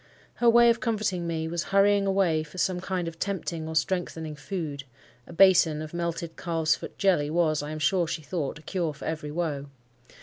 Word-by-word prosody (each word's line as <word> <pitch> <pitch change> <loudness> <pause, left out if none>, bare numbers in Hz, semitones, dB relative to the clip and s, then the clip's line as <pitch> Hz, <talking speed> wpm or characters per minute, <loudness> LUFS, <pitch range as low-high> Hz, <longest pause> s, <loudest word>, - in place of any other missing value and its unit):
Her 240 - +4
way 235 0 +7
of 230 - -1
comforting 205 -7 -1
me 160 -1 -2
was 170 +1 -3
hurrying 200 0 +3
away 190 -5 +2
for 155 +4 -11
some 180 0 0
kind 185 -2 -2
of 165 0 -7
tempting 175 -5 -3
or 160 - -5
strengthening 160 -1 -1
food—a 145 -6 -8
basin 170 -4 +5
of 155 +1 -7
melted 170 -1 -3
calves 160 -3 0
foot - - -9
jelly 175 -7 +2
was, 155 -2 +1
I 145 - -6
am 155 - -5
sure 170 +3 +1
she 160 -1 -4
thought, 150 -2 -3
a 155 - -15
cure 170 -5 -2
for - - -9
every 155 -2 -3
woe. 150 -3 -3
165 Hz, 195 wpm, -27 LUFS, 155-185 Hz, -, way